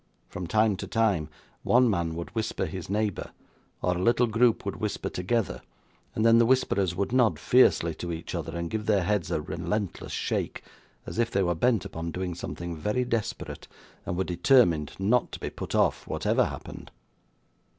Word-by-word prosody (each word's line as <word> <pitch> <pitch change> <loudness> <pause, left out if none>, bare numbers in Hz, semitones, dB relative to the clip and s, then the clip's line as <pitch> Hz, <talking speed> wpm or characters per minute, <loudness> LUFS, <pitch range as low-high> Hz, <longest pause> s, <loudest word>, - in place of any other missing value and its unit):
From 90 -1 -5
time 110 0 +2
to - - -6
time, 100 -9 +1 0.3
one 125 +1 +4
man 85 -6 0
would 85 0 -6
whisper 110 -4 -2
to 80 - -6
his 95 -1 -6
neighbour, 105 -1 -1 0.5
or 90 0 +2
a 90 - -2
little 120 +4 +4
group 115 +1 +2
would - - -3
whisper - - -3
together, 100 +4 -1 0.5
and 110 - +1
then 115 0 +7
the 115 - +5
whisperers 100 -8 +2
would 100 +4 -1
nod 120 -10 +3
fiercely 85 -6 +4
to 85 +2 -5
each 80 0 -6
other, - - -4
or 85 - -2
give 105 +5 -4
their 100 -4 +3
heads 100 -3 0
a - - 0
relentless 100 +5 -3
shake, - - -2 0.4
as - - -5
if 115 -1 +2
they 100 -3 +1
were 85 -1 +1
bent 115 +4 +1
upon 80 +1 -5
doing 90 +1 -3
something 85 0 -6
very 105 +9 -1
desperate, 110 -10 -3 0.4
and 85 - -3
were 95 - +1
determined 90 - +3
not 110 +6 +1
to - - -5
be - - -4
put - - -5
off, - - +2
whatever - - +1
happened. - - -8
100 Hz, 185 wpm, -27 LUFS, 85-115 Hz, 0.5 s, then